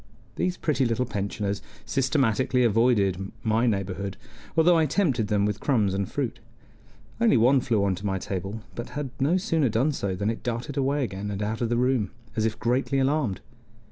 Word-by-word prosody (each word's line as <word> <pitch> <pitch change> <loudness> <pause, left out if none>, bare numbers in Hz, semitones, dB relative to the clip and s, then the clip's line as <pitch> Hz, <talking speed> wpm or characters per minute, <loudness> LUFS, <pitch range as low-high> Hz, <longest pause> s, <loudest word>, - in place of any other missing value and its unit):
These 180 0 -1
pretty 145 -4 +1
little 120 +1 +1
pensioners 100 -2 -3 0.2
systematically 130 -2 +2
avoided 100 -5 +2
my 115 +2 +2
neighborhood, 100 -2 -2 0.4
although 170 +2 +6
I 160 - +3
tempted 135 - +1
them 100 -1 +2
with 105 0 -1
crumbs 110 -9 +1
and 100 0 -1
fruit; - - -2 0.8
only 230 - +5
one 125 +4 +5
flew 110 -5 +1
onto 95 -1 -1
my 95 -2 0
table, 95 +3 -4
but 120 - -6
had 145 -3 -3
no 150 +7 +3
sooner 165 - +1
done 120 +8 +2
so 100 -9 -2
than 100 +4 0
it 115 - -6
darted 120 +3 -3
away 140 +1 +1
again, 100 -2 -4
and 100 0 -3
out 110 +3 -2
of 115 - 0
the 120 - +1
room, 125 -5 +1 0.3
as 110 -1 +1
if 110 0 -1
greatly 130 +4 0
alarmed. 135 -6 +1
115 Hz, 180 wpm, -26 LUFS, 100-135 Hz, 0.8 s, although